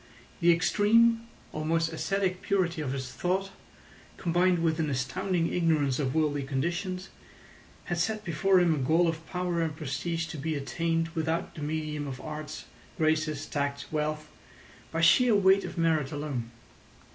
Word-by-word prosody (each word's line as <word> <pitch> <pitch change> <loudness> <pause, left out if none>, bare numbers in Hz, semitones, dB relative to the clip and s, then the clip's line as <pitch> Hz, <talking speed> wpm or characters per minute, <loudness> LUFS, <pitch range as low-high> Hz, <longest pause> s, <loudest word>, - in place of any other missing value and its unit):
The 175 -1 +5
extreme, 225 +6 +3 0.3
almost 165 +1 0
ascetic 190 +2 -1
purity 175 -5 0
of 135 -4 -2
his 130 -2 -4
thought, 190 +2 -1 0.7
combined 175 0 +2
with 160 -1 +1
an 155 -2 0
astounding 165 +6 -1
ignorance 155 -6 +2
of 135 -1 -1
worldly 150 -2 +1
conditions, 175 +7 -2 0.7
had 175 -2 -3
set 215 +3 -1
before 185 +3 +3
him 175 -2 +4
a 150 - -1
goal 160 +6 +3
of 165 0 -2
power 180 -2 -1
and 160 -2 -1
prestige 160 +2 -3
to 155 - -6
be 160 +2 -2
attained 165 +3 -1
without 165 0 -2
the 155 - -9
medium 150 -1 -3
of 130 -2 -6
arts, 155 0 -7 0.3
graces, 155 -2 +1
tact, 140 -1 -2
wealth—by 155 +1 -5
sheer 230 +7 +6
weight 195 0 +5
of - - -7
merit 160 -4 +1
alone. 145 -6 -4
165 Hz, 145 wpm, -28 LUFS, 150-180 Hz, 0.7 s, sheer